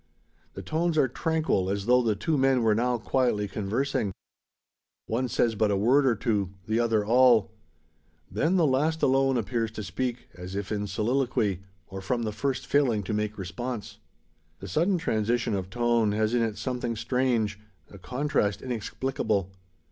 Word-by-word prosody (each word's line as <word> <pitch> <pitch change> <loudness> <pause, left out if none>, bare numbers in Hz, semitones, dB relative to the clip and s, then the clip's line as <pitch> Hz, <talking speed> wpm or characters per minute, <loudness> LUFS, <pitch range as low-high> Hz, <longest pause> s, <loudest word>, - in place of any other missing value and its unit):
The - - -7
tones 165 +1 0
are 135 - +4
tranquil, 155 - 0
as 100 0 -2
though 125 +2 +5
the 110 -3 +1
two 155 +10 -1
men 135 -3 +3
were 110 -1 +4
now 120 +3 +1
quietly 115 -3 0
conversing. 105 +1 -2 0.9
One 125 +3 -1
says 115 -1 +1
but 110 0 +1
a 100 - +1
word 130 +7 +4
or 120 - +3
two; 105 -3 0 0.2
the 110 +1 +1
other 110 -3 +1
all. 120 -2 +5 0.8
Then 160 - +1
the 175 -3 +4
last 155 +4 +1
alone 135 0 +3
appears 115 0 -1
to 110 - -5
speak, 125 +3 -3
as 90 +2 -8
if 100 +1 -4
in 105 -1 -2
soliloquy, 110 -2 0 0.3
or 95 +2 -8
from 120 +5 -1
the 110 - -2
first 130 +5 -2
failing 125 -8 +2
to 105 - -4
make 105 0 -2
response. 115 +5 -5 0.6
The 95 - -8
sudden 175 - +1
transition 115 -6 0
of 95 -2 -3
tone 120 -2 +1
has 110 +1 0
in 120 - +2
it 110 -2 -1
something 125 -2 -3
strange 115 -4 0 0.3
a 100 - -12
contrast 115 0 -1
inexplicable. 110 -4 -2
115 Hz, 165 wpm, -27 LUFS, 105-130 Hz, 0.9 s, though